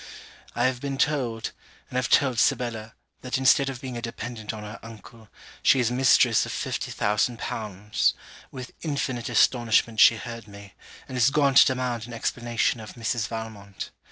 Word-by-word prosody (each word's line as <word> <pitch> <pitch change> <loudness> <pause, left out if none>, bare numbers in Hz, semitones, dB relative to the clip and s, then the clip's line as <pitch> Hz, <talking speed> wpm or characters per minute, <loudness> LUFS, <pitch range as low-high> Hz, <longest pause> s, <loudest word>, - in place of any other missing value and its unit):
I 120 - 0
have 130 -1 0
been 140 -1 -3
told, 125 -7 -1 0.4
and - - -12
have 125 -1 0
told 130 -5 +3
Sibella, 110 -2 0 0.3
that 125 +1 -2
instead 135 +1 +4
of 130 -1 -7
being 130 -3 -6
a 120 - -5
dependent 115 -1 -6
on 110 -1 -8
her 105 +2 -8
uncle, 115 -1 -13 0.3
she 135 - +4
is 120 -1 +1
mistress 130 0 +4
of - - -5
fifty - - -3
thousand 105 +3 0
pounds: 105 -2 -1 0.3
with 130 -2 -9
infinite 140 -6 -3
astonishment 115 -2 +2
she 115 - +8
heard 115 -1 -8
me, 100 -2 -13 0.3
and 130 -1 -4
is 120 - +5
gone 140 -1 +2
to 135 - +8
demand 125 -3 -2
an 120 - -9
explanation 120 0 -1
of 110 - -9
Mrs. 115 -1 -2
Valmont. 110 -3 -7
120 Hz, 170 wpm, -25 LUFS, 110-130 Hz, 0.4 s, she